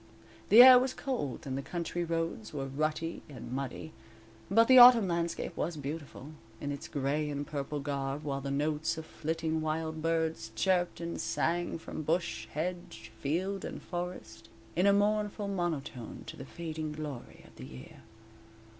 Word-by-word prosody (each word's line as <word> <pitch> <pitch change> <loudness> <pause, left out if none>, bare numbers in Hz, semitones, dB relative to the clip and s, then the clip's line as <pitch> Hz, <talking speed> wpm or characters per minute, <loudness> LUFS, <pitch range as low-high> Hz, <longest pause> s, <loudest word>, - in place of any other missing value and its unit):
The 230 +4 +11
air 255 -1 +10
was 260 +1 -1
cold 235 - -3
and 130 -1 -3
the 135 - -2
country 175 +3 -3
roads 165 -7 -3
were 135 -1 -2
rutty 155 +4 -2
and 130 -4 -9
muddy, 135 +4 -5 0.6
but 225 +4 +5
the 260 -1 +9
autumn 240 -4 +9
landscape 170 -1 -2
was 170 -2 -2
beautiful, 145 0 -7 0.3
in 145 - -3
its 140 - -6
gray 145 +1 -1
and 145 0 -3
purple 145 0 -4
garb, 140 0 -3
while 140 -2 -3
the 140 - -4
notes 150 +3 0
of 160 - -6
flitting 160 0 -2
wild 160 0 -2
birds 160 -8 -1
chirped 175 +8 +1
and 170 0 -4
sang 165 +5 -1
from 160 - -7
bush, 170 +3 -1
hedge, 160 -9 -5
field 185 +7 -1
and - - -6
forest, 175 -11 -6 0.3
in 180 +4 +3
a - - +7
mournful 205 0 +1
monotone 165 - -4
to - - -8
the 135 - -9
fading 155 0 -5
glory 150 -5 -8
of - - -18
the - - -8
year. 65 0 -12
160 Hz, 165 wpm, -31 LUFS, 140-175 Hz, 0.6 s, The